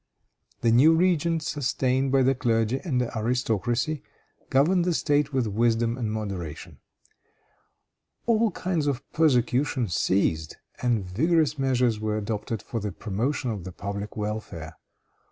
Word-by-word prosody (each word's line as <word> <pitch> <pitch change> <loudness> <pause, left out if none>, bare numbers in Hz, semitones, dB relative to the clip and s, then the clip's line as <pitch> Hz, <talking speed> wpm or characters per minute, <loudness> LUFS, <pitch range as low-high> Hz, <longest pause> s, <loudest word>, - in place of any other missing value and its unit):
The 115 - +3
new 145 +8 +6
regent, 170 -2 +2
sustained 130 -2 0
by 135 -1 +4
the 135 +1 +4
clergy 115 0 +1
and 145 -9 0
the 125 -1 -2
aristocracy, 120 +4 0 0.5
governed 170 +7 +3
the 175 -1 +1
State 145 -1 +1
with 130 -3 +1
wisdom 115 +2 +1
and 115 -4 -3
moderation. 100 -8 -5 1.5
All 230 -1 +3
kinds 175 -7 -2
of 135 -1 -2
persecution 130 - +2
ceased, 85 -3 0 0.2
and 120 -5 +1
vigorous 155 - +1
measures 125 -4 +2
were 110 0 -1
adopted 105 0 -3
for 115 - -4
the 105 -1 -3
promotion 115 +7 -2
of 100 -5 -5
the 95 - -7
public 100 +3 -6
welfare. 105 -7 -5
120 Hz, 135 wpm, -26 LUFS, 105-145 Hz, 1.5 s, new